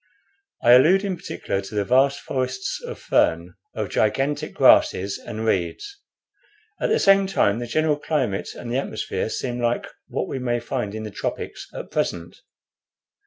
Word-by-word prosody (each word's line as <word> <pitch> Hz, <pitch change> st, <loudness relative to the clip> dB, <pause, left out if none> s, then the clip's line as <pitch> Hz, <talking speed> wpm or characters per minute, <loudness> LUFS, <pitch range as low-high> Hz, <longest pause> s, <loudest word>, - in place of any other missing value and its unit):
I 120 Hz, -, +6 dB
allude 160 Hz, +11 st, +6 dB
in 195 Hz, -2 st, -1 dB
particular 100 Hz, -, -4 dB
to 100 Hz, +2 st, -9 dB
the 100 Hz, -1 st, 0 dB
vast 135 Hz, +5 st, +3 dB
forests 130 Hz, 0 st, -3 dB
of -, -, -6 dB
fern, 85 Hz, +2 st, +1 dB, 0.2 s
of -, -, -3 dB
gigantic 135 Hz, +7 st, 0 dB
grasses 100 Hz, +2 st, +4 dB
and 110 Hz, 0 st, -6 dB
reeds. 100 Hz, -, -2 dB, 0.8 s
At -, -, +1 dB
the 445 Hz, -, +3 dB
same 195 Hz, 0 st, +5 dB
time 110 Hz, -, +2 dB
the 120 Hz, -, -4 dB
general 155 Hz, +3 st, +1 dB
climate 135 Hz, -10 st, -2 dB
and 120 Hz, -, -7 dB
the 125 Hz, -, 0 dB
atmosphere -, -, -3 dB
seem 125 Hz, -1 st, -3 dB
like 120 Hz, 0 st, 0 dB, 0.2 s
what -, -, -3 dB
we 135 Hz, -, -4 dB
may 120 Hz, -1 st, 0 dB
find 105 Hz, -3 st, -4 dB
in 110 Hz, -, -5 dB
the 105 Hz, -, -6 dB
tropics -, -, -5 dB
at -, -, -8 dB
present. 85 Hz, -1 st, -2 dB
120 Hz, 165 wpm, -23 LUFS, 105-145 Hz, 0.8 s, I